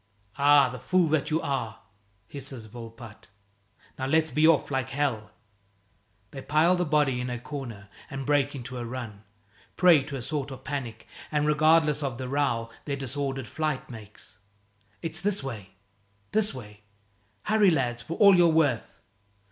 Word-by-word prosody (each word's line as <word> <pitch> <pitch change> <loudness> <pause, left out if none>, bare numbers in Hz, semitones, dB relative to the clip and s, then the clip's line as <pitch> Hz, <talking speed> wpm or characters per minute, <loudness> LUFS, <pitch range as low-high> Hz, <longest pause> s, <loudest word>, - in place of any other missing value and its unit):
"Ah, 145 -1 +6
the 125 0 -7
fool 185 -2 +2
that 155 -2 +1
you 155 +1 +1
are!" 130 -6 -3 0.5
hisses 135 -4 -6
Volpatte. 115 0 -11 0.7
"Now 130 - -2
let's 160 +2 +2
be 155 +4 +4
off 160 -3 +3
like 130 -1 -1
hell." 130 -6 -1 1.0
They 135 - -7
pile 160 +6 +3
the 180 0 0
body 145 -4 +2
in 125 - -4
a 125 - -3
corner 120 -6 -7 0.2
and 135 -2 -5
break 145 0 +1
into 130 -1 -6
a - - -4
run, 115 -4 -7 0.5
prey 175 -5 +6
to 145 -1 -6
a 135 - -4
sort 145 +1 -3
of 130 -1 -9
panic, 130 -7 -5 0.3
and 150 -1 +1
regardless 150 0 +3
of 135 -5 -3
the 130 0 -5
row 120 -4 -1
their 140 - -2
disordered 135 -1 -3
flight 155 -3 -3
makes. 105 -2 -12 0.6
"It's 165 +1 -2
this 200 -4 +1
way! 105 -8 -7 0.6
This 215 -1 +3
way! 105 -5 -11 0.6
Hurry, 210 -2 +4
lads 125 -7 0
for 165 - -6
all 200 -2 +7
you're 175 -1 +6
worth!" 150 -7 +1
140 Hz, 160 wpm, -27 LUFS, 120-155 Hz, 1.0 s, all